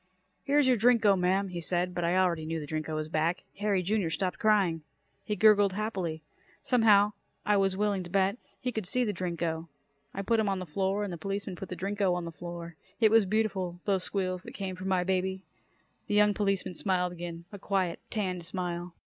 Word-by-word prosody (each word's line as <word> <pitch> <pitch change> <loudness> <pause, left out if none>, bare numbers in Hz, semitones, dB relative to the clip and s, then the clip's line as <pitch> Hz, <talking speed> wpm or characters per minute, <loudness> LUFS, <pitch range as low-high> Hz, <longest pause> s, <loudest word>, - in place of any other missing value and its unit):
"Here's 285 -1 +3
your 255 -2 +4
Drinko, 225 -3 +5
ma'am," 190 +2 +1
he 175 -1 -5
said, 180 +1 0
but 175 - -2
I 170 +2 +2
already 175 -4 +2
knew 160 +1 -3
the 150 - -6
Drinko 155 +1 -3
was 155 0 -2
back. 160 +3 0 0.2
Harry, 205 -3 +1
Jr., 200 -2 0
stopped 180 +2 -2
crying. 195 -7 +3 0.4
He 210 - -2
gurgled 205 -1 +5
happily. 185 -7 -3 0.4
Somehow, 210 -4 +5 0.3
I 210 - +3
was 195 -1 +1
willing 205 -2 +1
to 175 - -8
bet, 195 +3 +2 0.2
he 250 - -2
could 220 -5 -4
see 250 +4 +1
the 210 -3 -1
Drinko. 170 -2 -3 0.4
I 195 - -4
put 230 +3 +2
him 215 -2 +2
on 195 - 0
the 185 - -5
floor 190 +5 -1
and 200 -3 -4
the 170 - -7
policeman 195 +1 -3
put 190 +1 -8
the 180 - -4
Drinko 195 0 0
on 175 -1 -3
the 170 - -5
floor. 170 -1 -8 0.2
It 220 -2 +5
was 225 -3 +5
beautiful, 190 -4 -1
those 195 -3 +1
squeals 185 -2 -2
that - - -10
came 190 -1 -4
from 185 +1 -6
my 185 -2 +2
baby. 190 +1 -1 0.6
The 205 - 0
young 210 0 +5
policeman 195 -2 0
smiled 180 -1 0
again, 170 -1 -7
a 200 - -8
quiet, 185 -3 -1
tanned 185 -5 -2
smile. 175 -1 -4
190 Hz, 205 wpm, -29 LUFS, 175-205 Hz, 0.6 s, Drinko